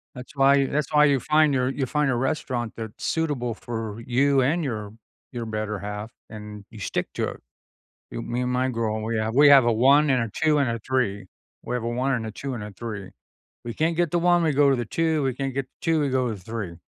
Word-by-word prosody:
that's 125 Hz, +3 st, -10 dB
why 140 Hz, 0 st, +4 dB
that's 150 Hz, +2 st, -2 dB
why 150 Hz, 0 st, +6 dB
you 140 Hz, -2 st, +3 dB
find 155 Hz, 0 st, +3 dB
your, 130 Hz, 0 st, +1 dB
you 135 Hz, 0 st, -2 dB
find 150 Hz, +2 st, 0 dB
a 130 Hz, -, +1 dB
restaurant 125 Hz, -3 st, -2 dB
that's 110 Hz, -2 st, -8 dB
suitable 145 Hz, -8 st, -1 dB
for 115 Hz, -1 st, -6 dB
you, 135 Hz, +2 st, +3 dB
and 155 Hz, +6 st, +1 dB
your, 105 Hz, -6 st, -4 dB, 0.4 s
your 120 Hz, -2 st, -5 dB
better 110 Hz, -1 st, -3 dB
half, 105 Hz, +2 st, -6 dB, 0.2 s
and 105 Hz, -1 st, -9 dB
you 110 Hz, -, -11 dB
stick 100 Hz, -, -2 dB
to -, -, -1 dB
it. -, -, -10 dB, 0.7 s
Y -, -, -5 dB
me 120 Hz, +1 st, -3 dB
and 125 Hz, 0 st, -1 dB
my 130 Hz, +1 st, +1 dB
girl, 110 Hz, -3 st, -2 dB
we 115 Hz, 0 st, -1 dB
have 110 Hz, +2 st, -2 dB
we 145 Hz, 0 st, +7 dB
have 135 Hz, -3 st, +8 dB
a 120 Hz, -, +3 dB
1, 140 Hz, +6 st, +5 dB
and 130 Hz, -3 st, +2 dB
a 115 Hz, -, -5 dB
2, 155 Hz, -1 st, +4 dB
and 140 Hz, -4 st, +1 dB
a 115 Hz, 0 st, -2 dB
3 110 Hz, -5 st, -1 dB, 0.4 s
we 125 Hz, -, -3 dB
have 125 Hz, -, -3 dB
a -, -, -2 dB
1, 130 Hz, +3 st, 0 dB
and 115 Hz, -3 st, -2 dB
a 110 Hz, -, -5 dB
2, 135 Hz, +5 st, -5 dB
and 110 Hz, -4 st, -5 dB
a 105 Hz, -, -7 dB
3. 105 Hz, -2 st, -7 dB, 0.6 s
We 120 Hz, -, -4 dB
can't 160 Hz, +5 st, 0 dB
get 175 Hz, -3 st, +1 dB
the 175 Hz, -, +2 dB
1, 175 Hz, 0 st, +3 dB
we 155 Hz, -2 st, +2 dB
go 140 Hz, 0 st, +4 dB
to 135 Hz, -, +3 dB
the 120 Hz, -, -2 dB
2, 160 Hz, +4 st, 0 dB
we 135 Hz, -1 st, 0 dB
can't 135 Hz, +1 st, -3 dB
get 135 Hz, 0 st, -2 dB
the -, -, -54 dB
2, 165 Hz, -2 st, +1 dB
we 145 Hz, -, 0 dB
go 130 Hz, -1 st, 0 dB
to 110 Hz, -, -3 dB
the -, -, -12 dB
3. 100 Hz, -4 st, -5 dB
125 Hz, 255 wpm, -24 LUFS, 115-140 Hz, 0.7 s, have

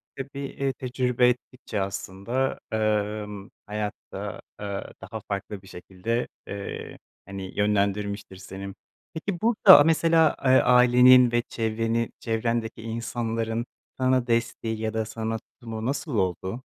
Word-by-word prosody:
Tabii, 135 Hz, +1 st, -7 dB
eee, 140 Hz, -1 st, -2 dB
tecrübe 125 Hz, -1 st, +1 dB
ettikçe 125 Hz, -3 st, -4 dB
aslında, 100 Hz, +7 st, -2 dB
emm, 105 Hz, -2 st, -1 dB, 0.2 s
hayatta, 105 Hz, 0 st, -5 dB, 0.2 s
eee, 100 Hz, -1 st, -5 dB
daha 105 Hz, +4 st, -6 dB
farklı 100 Hz, 0 st, -4 dB
bir 95 Hz, -, -17 dB
şekilde, 95 Hz, +7 st, -3 dB, 0.2 s
eee, 100 Hz, 0 st, -6 dB, 0.3 s
hani, 95 Hz, -1 st, -7 dB
yönlendirmiştir 100 Hz, -1 st, 0 dB
seni. 95 Hz, +1 st, -8 dB, 0.4 s
Peki 175 Hz, +2 st, -4 dB
burada, 210 Hz, -9 st, +8 dB
mesela, 165 Hz, 0 st, +4 dB
eee, -, -, +4 dB
ailenin 125 Hz, 0 st, +7 dB
ve 120 Hz, 0 st, +2 dB
çevreni 115 Hz, +1 st, -1 dB
çevrendeki 115 Hz, 0 st, -2 dB
insanların 115 Hz, 0 st, -2 dB, 0.3 s
sana 130 Hz, -1 st, +2 dB
desteği 115 Hz, -1 st, -1 dB
ya 110 Hz, 0 st, -2 dB
da 110 Hz, 0 st, -1 dB
sana 110 Hz, +1 st, -3 dB
tutumu 115 Hz, -2 st, -8 dB
nasıl 140 Hz, +1 st, -2 dB
oldu? 95 Hz, +5 st, -1 dB
115 Hz, 120 wpm, -26 LUFS, 105-125 Hz, 0.4 s, burada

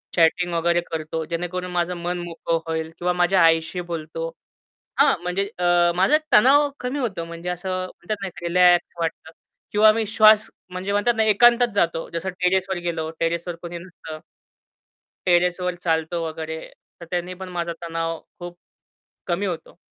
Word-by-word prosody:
Chatting 175 Hz, +1 st, +3 dB
वगैरे 170 Hz, +1 st, +2 dB
करतो, 160 Hz, 0 st, -3 dB
जेणेकरून 180 Hz, +2 st, -4 dB
माझं 175 Hz, 0 st, 0 dB
मन 175 Hz, +1 st, -3 dB
मोकळं 165 Hz, -1 st, -2 dB
होईल, 160 Hz, 0 st, -3 dB
किंवा 180 Hz, 0 st, 0 dB
माझ्या 180 Hz, +1 st, +3 dB
आईशी 165 Hz, +2 st, +2 dB
बोलतो. 165 Hz, 0 st, -4 dB, 0.7 s
हां, -, -, +5 dB
म्हणजे 195 Hz, +3 st, -1 dB
अ, 175 Hz, -1 st, +4 dB
माझा 195 Hz, +12 st, +4 dB, 0.2 s
तणाव 285 Hz, +6 st, +6 dB
कमी 255 Hz, +3 st, -3 dB
होतो, 190 Hz, -10 st, -3 dB
म्हणजे 170 Hz, +1 st, -6 dB
असं 180 Hz, +1 st, -4 dB, 0.2 s
म्हणतात 200 Hz, +3 st, -5 dB
ना, 195 Hz, -, -3 dB
एक 175 Hz, -, -11 dB
रिलॅक्स 180 Hz, 0 st, +4 dB
वाटतं. 160 Hz, -1 st, -3 dB, 0.4 s
किंवा 215 Hz, +1 st, +6 dB
मी 220 Hz, 0 st, -1 dB
श्वास 215 Hz, 0 st, +5 dB, 0.2 s
म्हणजे 185 Hz, +2 st, -4 dB
म्हणतात 205 Hz, +4 st, +2 dB
ना, 220 Hz, -, +2 dB
एकांतात 240 Hz, +3 st, +5 dB
जातो, 170 Hz, -4 st, 0 dB
जसं 170 Hz, +3 st, -3 dB
टेरेसवर 190 Hz, +1 st, +1 dB
गेलो, 160 Hz, -2 st, -2 dB
टेरेसवर 170 Hz, +1 st, -1 dB
कोणी 170 Hz, 0 st, -6 dB
नसतं. 170 Hz, -3 st, -10 dB, 1.1 s
टेरेसवर 180 Hz, +1 st, +2 dB
चालतो 160 Hz, +1 st, 0 dB
वगैरे, 160 Hz, 0 st, -5 dB, 0.4 s
तर 170 Hz, -, -9 dB
त्याने 180 Hz, +1 st, -2 dB
पण 185 Hz, -, -6 dB
माझा 170 Hz, 0 st, -2 dB
तणाव 165 Hz, -1 st, -3 dB, 0.2 s
खूप 175 Hz, 0 st, -8 dB, 0.7 s
कमी 185 Hz, +3 st, -1 dB
होतो. 170 Hz, -2 st, -6 dB
175 Hz, 155 wpm, -23 LUFS, 165-190 Hz, 1.1 s, तणाव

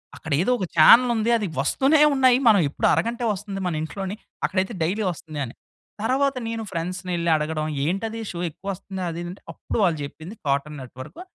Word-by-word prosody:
"అక్కడ 160 Hz, -, -9 dB
ఏదో 205 Hz, -, +1 dB
ఒక 190 Hz, -, -2 dB
చానెల్ 235 Hz, +10 st, +8 dB
ఉంది 225 Hz, +1 st, +1 dB
అది 210 Hz, -3 st, -2 dB
వస్తూనే 275 Hz, -, +3 dB
ఉన్నాయి 260 Hz, -2 st, +5 dB
మనం 205 Hz, -4 st, +5 dB
ఎప్పుడు -, -, 0 dB
అరగం‌టె 235 Hz, +1 st, -1 dB
వస్తుంది 195 Hz, 0 st, -6 dB
మన 175 Hz, -, -1 dB
ఇంట్లోని 190 Hz, +5 st, -5 dB, 0.3 s
అక్కడైతే 190 Hz, +3 st, -1 dB
డైలీ 195 Hz, +7 st, 0 dB
వస్తుంది" 155 Hz, -2 st, -8 dB
అని. 120 Hz, -, -10 dB, 0.5 s
తరువాత 270 Hz, +3 st, +1 dB
నేను 225 Hz, -1 st, -3 dB
ఫ్రెండ్స్‌నేళ్లి 175 Hz, 0 st, -2 dB
అడగడం 155 Hz, 0 st, -2 dB, 0.2 s
ఏంటది 220 Hz, +7 st, -2 dB
షో 170 Hz, -, -6 dB
ఎక్కువ 195 Hz, -, -14 dB
వస్తుం‌ది 190 Hz, 0 st, -7 dB
అది 170 Hz, +1 st, -5 dB
అంటే 185 Hz, -, -12 dB
అప్పుడు -, -, -5 dB
వాళ్ళు 170 Hz, -4 st, +2 dB
చెప్పింది 160 Hz, +8 st, -10 dB
కార్టూన్ 140 Hz, +2 st, -1 dB
నెట్వర్కు 130 Hz, -, -10 dB
185 Hz, 175 wpm, -24 LUFS, 160-225 Hz, 0.5 s, చానెల్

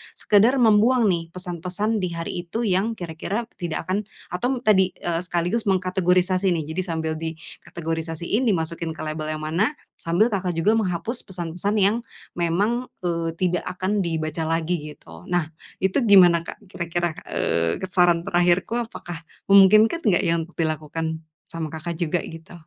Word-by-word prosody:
sekedar 215 Hz, +6 st, +4 dB
membuang 225 Hz, +1 st, +5 dB
nih, 165 Hz, -2 st, -2 dB
pesan-pesan 185 Hz, +4 st, -3 dB
di 180 Hz, -2 st, -2 dB
hari 170 Hz, +1 st, -4 dB
itu 225 Hz, +7 st, -3 dB
yang 205 Hz, +2 st, +1 dB
kira-kira 180 Hz, +4 st, -4 dB, 0.2 s
tidak 170 Hz, -3 st, -3 dB
akan 200 Hz, +3 st, 0 dB, 0.3 s
atau 245 Hz, +8 st, -1 dB
tadi, 190 Hz, -5 st, +3 dB
eee, 170 Hz, -1 st, -2 dB
sekaligus 175 Hz, +6 st, -1 dB
mengkategorisasi 185 Hz, 0 st, +2 dB
nih. 165 Hz, -2 st, -1 dB
Jadi -, -, +2 dB
sambil 160 Hz, -2 st, -2 dB
dikategorisasiin, 165 Hz, +5 st, -4 dB
dimasukin 165 Hz, -4 st, -1 dB
ke -, -, -8 dB
label 155 Hz, 0 st, -4 dB
yang 155 Hz, -, -7 dB
mana, 180 Hz, -, +1 dB, 0.3 s
sambil 175 Hz, +8 st, +2 dB
Kakak 185 Hz, -3 st, -1 dB
juga 205 Hz, +7 st, +3 dB
menghapus 215 Hz, +5 st, -2 dB
pesan-pesan 180 Hz, +2 st, -3 dB
yang 200 Hz, +3 st, +4 dB, 0.4 s
memang, 205 Hz, +9 st, 0 dB, 0.2 s
eee, 165 Hz, -2 st, -1 dB
tidak 180 Hz, -1 st, 0 dB
akan 195 Hz, +3 st, 0 dB
dibaca 160 Hz, -1 st, -2 dB
lagi 165 Hz, -2 st, -1 dB
gitu. 80 Hz, +1 st, -14 dB
Nah, 175 Hz, -3 st, 0 dB, 0.4 s
itu 190 Hz, +8 st, +2 dB
gimana 180 Hz, -5 st, +7 dB
Kak -, -, -7 dB
kira-kira, 175 Hz, -1 st, -2 dB, 0.2 s
eee, 85 Hz, 0 st, +1 dB
saran 175 Hz, -2 st, +4 dB
terakhirku 175 Hz, +5 st, +2 dB
apakah 175 Hz, -8 st, -5 dB, 0.3 s
memungkinkan 215 Hz, -, +6 dB
nggak 195 Hz, -7 st, +3 dB
ya, 165 Hz, -, +2 dB
untuk 165 Hz, +2 st, -7 dB
dilakukan, 160 Hz, 0 st, -2 dB, 0.2 s
sama 160 Hz, -2 st, -5 dB
Kakak 165 Hz, +1 st, -5 dB
juga 175 Hz, 0 st, 0 dB
gitu. 165 Hz, +2 st, -10 dB
175 Hz, 150 wpm, -23 LUFS, 165-200 Hz, 0.4 s, gimana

